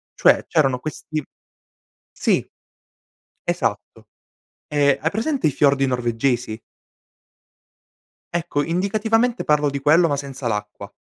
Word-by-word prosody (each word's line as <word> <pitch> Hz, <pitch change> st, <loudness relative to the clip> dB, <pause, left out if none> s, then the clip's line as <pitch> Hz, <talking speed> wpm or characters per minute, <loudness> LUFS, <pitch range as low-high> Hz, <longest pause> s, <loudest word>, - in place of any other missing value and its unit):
cioè -, -, +4 dB
c'erano 135 Hz, -6 st, +2 dB
questi 155 Hz, +1 st, -5 dB, 0.9 s
sì. -, -, +1 dB, 1.0 s
Esatto. 110 Hz, -, -2 dB, 0.6 s
E 145 Hz, -2 st, +3 dB
hai 160 Hz, +4 st, 0 dB
presente, 230 Hz, -, 0 dB
i -, -, +1 dB
fiordi 140 Hz, 0 st, +3 dB
norvegesi? 120 Hz, -2 st, -1 dB, 1.8 s
Ecco, 170 Hz, -4 st, -1 dB
indicativamente 220 Hz, -, +1 dB
parlo 150 Hz, -1 st, +3 dB
di 140 Hz, 0 st, -3 dB
quello, 155 Hz, +5 st, +4 dB
ma 145 Hz, -, 0 dB
senza 140 Hz, -2 st, -5 dB
l'acqua. 105 Hz, -2 st, -4 dB
145 Hz, 105 wpm, -21 LUFS, 125-170 Hz, 1.8 s, cioè